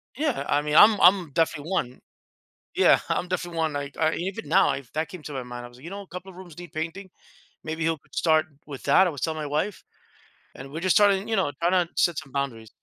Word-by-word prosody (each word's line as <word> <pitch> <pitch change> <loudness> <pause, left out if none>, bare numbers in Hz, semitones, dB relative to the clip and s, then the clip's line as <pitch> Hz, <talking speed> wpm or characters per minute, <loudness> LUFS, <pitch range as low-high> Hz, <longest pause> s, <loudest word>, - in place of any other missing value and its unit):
yeah, 290 0 -1
I 145 - +2
mean, 150 0 -2
I'm 210 +4 +7
I'm 180 -3 +5
definitely 160 0 0
one. 125 -9 -2 0.8
Yeah. - - +5
I'm 180 - -2
definitely 175 -2 -3
one. 160 -1 +1
Like, 140 -1 -5 0.2
even 180 -4 -5
now, 190 +4 +4
if 135 -3 -8
that 155 +1 -2
came 180 0 -10
to 150 - -7
my 130 -2 -4
mind, 120 0 -8
I 120 - -10
was, 120 - -18
you 160 +6 -9
know, 200 +1 -7
a 200 - -13
couple 180 +2 -9
of 185 - -13
rooms 180 -4 -12
need 175 -1 -11
painting. 165 +5 -5 0.6
Maybe 160 +1 -4
he'll 165 0 0
start 155 -2 +2 0.2
with 140 -3 -9
that, 180 +7 +5
I - - -1
was 145 - -9
telling 160 -1 -1
my 150 - -4
wife. 155 +7 -2 0.7
And 135 +1 -10
we're 160 - -6
just 185 +1 +2
starting, 200 -2 +4
you 225 - -1
know, 190 -8 +1
trying 175 +2 +2
to 180 -2 +2
set 170 -3 +2
some 135 - -7
boundaries. 130 -5 -4
165 Hz, 240 wpm, -25 LUFS, 145-185 Hz, 0.8 s, I'm